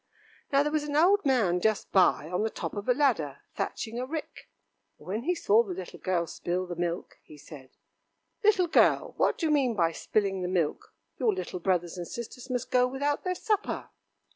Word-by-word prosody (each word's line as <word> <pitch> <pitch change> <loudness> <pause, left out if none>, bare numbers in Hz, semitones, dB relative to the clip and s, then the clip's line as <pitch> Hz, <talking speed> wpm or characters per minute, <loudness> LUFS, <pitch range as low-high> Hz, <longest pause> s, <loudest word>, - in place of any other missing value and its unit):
Now 280 0 +4
there 295 - -1
was 310 -1 +1
an 290 -1 -3
old 380 +6 +5
man 200 -10 +2
just 215 0 0
by 185 -5 +4
on 180 +3 -1
the 220 - +1
top - - -5
of 205 +3 -5
a - - +6
ladder 225 - +1
thatching 230 +1 -4
a 250 - -2
rick, 310 +2 -6 0.5
and - - -17
when 210 +5 -2
he 355 +2 +1
saw 225 -9 +4
the 195 -6 -5
little 185 -1 -8
girl 180 -2 0
spill 175 +3 -3
the 175 -1 -6
milk, 175 0 -3
he 150 - -15
said: 140 -3 -12 0.7
"Little 410 -4 +4
girl, 335 - +3
what - - +2
do 330 - -2
you 310 - +2
mean 265 -6 +2
by 165 -4 +2
spilling 195 +2 -1
the 180 - -2
milk? 175 -5 -2 0.2
Your 240 -5 +3
little 185 0 -5
brothers 175 -1 0
and 175 - -5
sisters 240 +2 -8
must 250 -1 -3
go 250 0 +4
without 285 +3 -1
their 365 -1 -1
supper." 420 +2 -2
220 Hz, 205 wpm, -28 LUFS, 180-285 Hz, 0.7 s, a